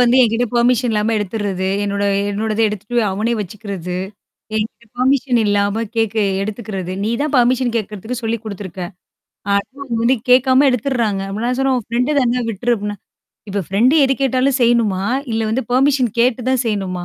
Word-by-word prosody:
வந்து 245 +1 +4
என்கிட்ட 230 +1 +2
பெர்மிஷன் 240 0 +3
இல்லாம 215 +2 +1
எடுத்துர்றது. 200 -2 -2 0.2
என்னோட 200 0 -1 0.3
என்னோடத 215 +2 -2
எடுத்துட்டு 210 +3 -3
அவனே 220 +4 -1
வச்சுக்கிறது. 195 -3 -5 0.6
என் 215 0 +1
கிட்ட 235 - -26
பெர்மிஷன் 255 -1 +2
இல்லாம 205 +2 +1
கேக்க 225 -1 0 0.3
எடுத்துக்கறது. 200 -3 -4
"நீ 215 - 0
தான் 300 -1 -2
பெர்மிஷன் 250 0 +2
கேக்குறதுக்கு 220 +2 -4
சொல்லி் 225 +1 0
குடுத்துருக்க. 195 -4 -6 0.7
அனா 200 - +4 0.3
அவங்க 245 -4 -3
வந்து 250 +3 +3
கேட்காம 260 +2 +5
எடுத்துடுறாங்க". 235 -5 0
அப்ப 205 +3 -4
நான் 250 +1 -1
சொன்னேன், 270 -1 +2
"உன் 215 - -8
ஃப்ரெண்ட் 250 +5 0
தானா? 245 0 +1
விட்டுரு" 235 +3 0
அப்டின்னா. 205 0 -4 0.5
"இப்ப 200 0 -2
ஃப்ரெண்ட் 235 +9 +3
எது 270 0 +2
கேட்டாலும் 265 +1 +2
செய்யணுமா? 230 -5 +2 0.3
இல்ல 225 - 0
வந்து 245 +2 -1
பெர்மிஷன் 260 -3 +3
கேட்டு 245 0 +1
தான் 260 -1 +2
செய்யணுமா? 190 -5 -2
230 Hz, 160 wpm, -18 LUFS, 205-250 Hz, 0.7 s, கேட்காம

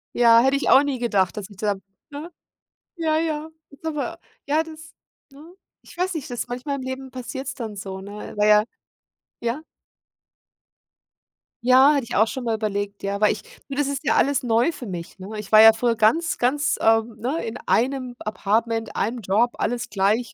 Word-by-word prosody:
Ja, 230 -1 +6
hätte 265 +2 +3
ich 280 - 0
auch 270 - +7
nie 280 -3 -2
gedacht, 205 -6 +1
dass 205 -1 -6
ich 200 - -15
da 205 -1 0 0.3
ne? 295 +4 -8 0.6
Ja, 320 -3 0
ja. 315 -1 -2 0.2
Ist 280 +3 -16
aber 300 -3 -3 0.3
Ja, 305 +3 +2
das 320 0 -12 0.4
ne? 305 +6 -14 0.3
Ich - - -16
weiß 365 +1 0
nicht, 305 - -5
das 245 -1 -4
manchmal 255 +4 -4
im - - -6
Leben 260 0 -6
passiert's 265 +2 -6
dann 225 -6 -6
so, 190 -1 -6
ne? 205 +2 -8
Na 210 - +3
ja 210 0 +6 0.8
Ja? 235 +5 -2 2.0
Ja, 260 +4 +6
hatte 280 - 0
ich 235 - -6
auch 220 +2 +4
schon 260 - -5
mal 230 -2 0
überlegt, 205 -2 -3
ja, 200 0 -2
weil 210 - +4
ich 210 - -8 0.3
Du, 275 - -6
das 290 0 +1
ist 280 -2 -3
ja - - +2
alles 280 0 +2
neu 235 +5 +2
für 265 -6 -9
mich, 175 -3 -7
ne. 190 0 -9
Ich 210 - -9
war 215 - +8
ja 225 0 +9
früher 230 +1 0
ganz 230 +10 +2
ganz, 290 +6 +1
ähm, 225 0 +2
ne, 270 +8 -2
in 230 +1 -5
einem 255 0 0
Apartment, 225 +2 -1
einem 230 +4 -1
Job, 220 +5 +1
alles 245 +1 -2
gleich. 210 +4 0
245 Hz, 190 wpm, -23 LUFS, 215-280 Hz, 2.0 s, ja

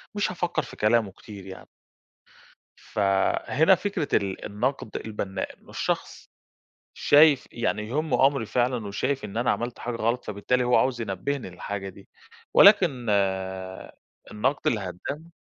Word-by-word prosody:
مش 205 -2 0
هافكّر 175 -3 -1
في - - -11
كلامه 105 -1 +2
كتير 100 0 -12
يعني. 95 -1 -10 1.1
فهنا 100 - +2
فكرة 190 -5 -3
ال 95 -1 -2
النقد 115 +2 -3
البنّاء 100 -3 -5
إنّه - - -18
الشخص 175 -1 -3 0.6
شايف 145 -2 +5
يعني 110 -2 -2
يهمّه 150 +1 +2
أمري 135 -5 0
فعلًا 120 -1 0
وشايف 130 +6 -2
إن 105 0 -7
أنا 120 +2 +1
عملت 120 0 -2
حاجة 120 -1 -4
غلط، 115 +2 -1
فبالتالي 110 +5 0
هو 125 0 +3
عاوز 120 +1 +1
ينبهني 115 +4 -3
للحاجة 95 +2 -5
دي 95 +1 -14 0.5
ولكن 175 - +6 1.3
النقد 130 +7 -1
الهدام 115 - -3
120 Hz, 130 wpm, -26 LUFS, 100-140 Hz, 1.3 s, ولكن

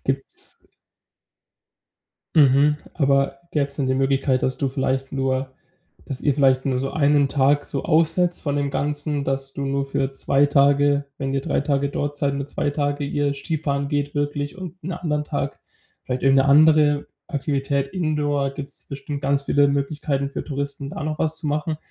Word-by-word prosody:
Gibt's 135 0 -3 1.8
Mhm, 145 0 +5 0.2
aber 140 -2 +2
gäbe 145 -2 +2
es 140 0 -13
denn 140 - 0
die 130 - +1
Möglichkeit, 135 -1 +1
dass 130 - 0
du 140 - 0
vielleicht 130 0 -1
nur 130 0 -1 0.5
dass 135 - -5
ihr 145 - +3
vielleicht 130 -2 +3
nur 130 -2 0
so 135 +1 -2
1 145 -1 +3
Tag 145 +1 +2
so 140 - -4
aussetzt 165 +2 +2
von 145 -1 -1
dem 140 -1 0
Ganzen, 145 0 -1
dass 135 0 -2
du 140 0 -4
nur 140 0 0
für 135 0 -1
2 140 +1 +3
Tage, 145 0 +3
wenn 135 0 -2
ihr 135 - 0
3 - - 0
Tage 140 0 0
dort 145 +1 -3
seid, 140 -1 0
nur 140 0 -3
2 145 - -1
Tage 145 0 -1
ihr 145 0 0
Skifahren 140 -1 -2
geht 145 0 -1
wirklich 145 +1 -2
und 185 -1 -7
'n 180 +3 -4
anderen 150 -4 -2
Tag 140 -2 -3 0.4
vielleicht 125 0 -3
irgend 135 0 +5
'ne 135 - +4
andere 150 0 +5 0.2
Aktivität 140 -2 -1
Indoor 145 -4 0
gibt 140 0 -7
es - - -13
bestimmt 140 +1 -6
ganz 140 0 +1
viele 145 0 +3
Möglichkeiten 140 0 -1
für - - -4
Touristen, 140 -1 -4
da 150 - -5
noch 155 0 -3
was 160 0 -1
zu 160 -1 -4
machen, 150 +2 -1
140 Hz, 180 wpm, -23 LUFS, 135-145 Hz, 1.8 s, Mhm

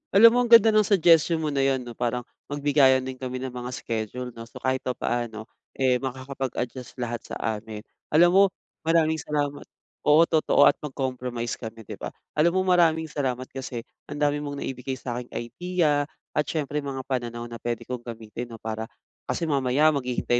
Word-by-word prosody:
Alam 225 +4 +10
mo, 245 - +3
ang 245 - 0
ganda 230 -1 +8
ng 215 -2 +4
suggestion 170 -4 +5
mo 150 - 0
na 140 - -1
yon 135 -1 +1
'no. 120 - -8
Parang 120 +1 -2 0.3
magbigayan 140 -2 +4
din 130 -1 -6
kami 130 -1 -4
ng 130 - -4
mga 125 0 -5
schedule 115 +2 -4
'no. 115 0 -10
So, - - -12
kahit 130 0 +1
papaano, 120 -3 -2 0.3
eh, 130 -2 +2
makakapag-adjust 130 -1 -5
lahat 120 -2 -3
sa - - -6
amin. 110 0 -4 0.3
Alam 170 +3 +6
mo, 195 +1 +7 0.4
maraming 160 -1 +3
salamat. 145 -1 -2 0.4
Oo, 150 +2 +7
totoo 160 -2 +3
at - - +4
mag-compromise 125 -4 -3
kami, 115 -1 -8
'di - - -8
ba? - - -4 0.3
Alam 170 +3 +4
mo, - - +4
maraming 170 -3 +4
salamat 130 -4 -2
kasi 130 -3 -5 0.2
ang - - -6
dami 145 0 +2
mong 145 -1 -5
naibigay 130 0 -4
sa 120 -1 -4
aking 125 - -9
idea 150 +2 0 0.3
at 150 - +1
siyempre 150 -2 -2
mga 135 -2 -4
pananaw 120 -3 -3
na 120 -1 -8
pwede 120 +1 -3
kong 125 -1 -5
gamitin 115 +1 -6
'no, 115 - -8
para 110 0 -4 0.4
kasi - - -1
mamaya, 140 +1 +3
maghihintay 125 -3 0
130 Hz, 180 wpm, -25 LUFS, 120-150 Hz, 0.4 s, Alam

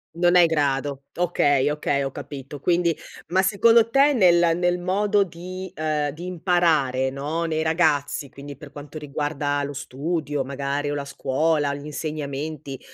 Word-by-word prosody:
Non 175 +1 +3
è 180 - +8
i - - +7
grado. 140 -3 -1
Okay, 145 -6 +2
okay 150 -1 0
ho 135 0 -2
capito. 140 +1 -8
Quindi 170 +1 +2 0.3
ma, 185 +2 +2
secondo 225 +4 +4
te, 275 +4 +4
nel 175 -7 +4
nel 175 0 +1
modo 200 +3 +2
di 185 +1 -8
uhm, 150 -1 -1
di 165 +5 -9
imparare, 165 -8 +1
no, 150 +5 -3
nei 160 -1 -1
ragazzi, 155 -4 +1
quindi 140 +1 -10
per 145 0 -12
quanto 145 +2 -9
riguarda 145 -1 -2
lo 140 0 -4
studio, 145 +1 -3
magari, 140 +2 -3
o 145 - -2
la 140 -1 -4
scuola, 140 +2 0
gli 145 +1 -9
insegnamenti, 150 -2 -5
150 Hz, 160 wpm, -23 LUFS, 140-175 Hz, 0.3 s, è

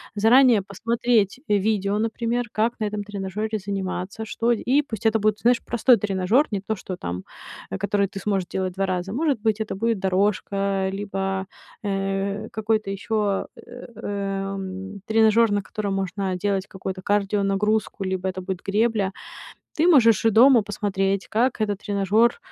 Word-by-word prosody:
заранее 230 +1 +5
посмотреть, 225 +2 0
э, 210 -1 +3
видео, 200 0 0
например, 230 +2 -1
как 225 +2 +1
на 215 - 0
этом 210 0 -3
тренажёре 210 +2 -3
заниматься, 195 +1 -4
что, 230 +1 0
и 250 +5 +2
пусть 225 -6 -2
это 220 0 +3
будет, 215 0 +1
знаешь, 240 0 +3
простой 240 +1 +4
тренажёр, 200 +6 +2
не 200 -2 -2
то, 220 +3 -2
что 185 - -14
там, 90 - -5 0.5
э, - - -2
который 200 0 0
ты 195 - -7
сможешь 195 -2 -1
делать 185 -1 -3
2 195 +1 -1
раза. 185 +1 -2
Может 285 -1 0
быть, 220 -1 +1
это 215 - -3
будет 225 +1 0
дорожка 195 0 0
либо, 195 -1 -3 0.4
э, 195 +1 -2
какой-то 220 -1 -1
ещё, 205 0 -1
эм, 195 -4 -5
тренажёр, 220 0 +4
на 205 0 +1
котором 200 0 -4
можно 190 0 -2
делать 195 +1 -1
какую-то 190 0 -6
кардионагрузку, 205 +1 0
либо 190 0 -2
это 185 0 -3
будет 185 -1 -4
гребля. 210 -1 +1 0.6
Ты 320 +3 +3
можешь 230 - +5
и - - +6
дома 240 +2 +6
посмотреть, 195 -1 -1
как 240 +3 +1
этот 205 -2 0
тренажёр 205 +3 +2
205 Hz, 155 wpm, -23 LUFS, 195-220 Hz, 0.6 s, и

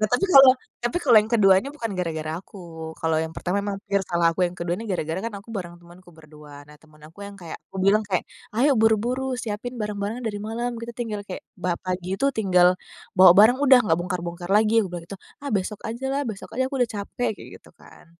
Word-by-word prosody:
Nah 215 - +1
tapi 245 - +1
kalau 270 -1 +10 0.3
tapi 240 - -1
kalau 245 -5 +5
yang 215 - -5
keduanya 195 0 +4
bukan 230 -8 -4
gara-gara 160 -3 -3
aku. 195 - -15 0.4
Kalau 160 -1 +1
yang 160 0 -4
pertama 180 +2 -2
memang 200 -1 -3
pure 200 0 0
salah 170 -1 +1
aku, 165 - -5
yang 175 - -12
kedua 170 -1 -3
ini 225 - -7
gara-gara 165 -1 -2
kan 230 - -4
aku 200 - -18
bareng 175 -3 -6
temenku 175 +1 -17
berdua. 150 -2 -14
Nah 150 - -15
temen 155 -1 -22
aku 165 +5 -19
yang 200 0 -11
kayak 170 -4 -9
kubilang 195 +2 +3
kayak, 185 -3 0 0.3
"Ayo 275 +5 +4
buru-buru, 245 +4 +1
siapin 245 +1 -5
barang-barangnya 210 +3 -4
dari 210 -2 -3
malam," 225 +3 -3
gitu, 235 +1 -7
"tinggal 225 -4 -4
kayak, 185 - -6 0.2
ba 180 -1 -1
pagi 185 0 -3
itu 275 - 0
tinggal 180 -5 +3 0.4
bawa 185 -1 +9
barang 220 +5 +6
udah 265 -2 +7
nggak 165 -6 +2
bongkar-bongkar 175 0 -5
lagi," 215 +2 +4
aku 200 - -3
bilang 175 -1 -6
gitu. 200 - -8 0.3
"Ah 280 - -3
besok 200 +1 -2
ajalah, 265 +5 -2
besok 205 -3 -7
aja, 260 - +1
aku 275 - -3
udah 245 - +2
capek!" 205 +4 -3
kayak - - -12
gitu - - -20
kan. - - -18
200 Hz, 220 wpm, -24 LUFS, 175-230 Hz, 0.4 s, kalau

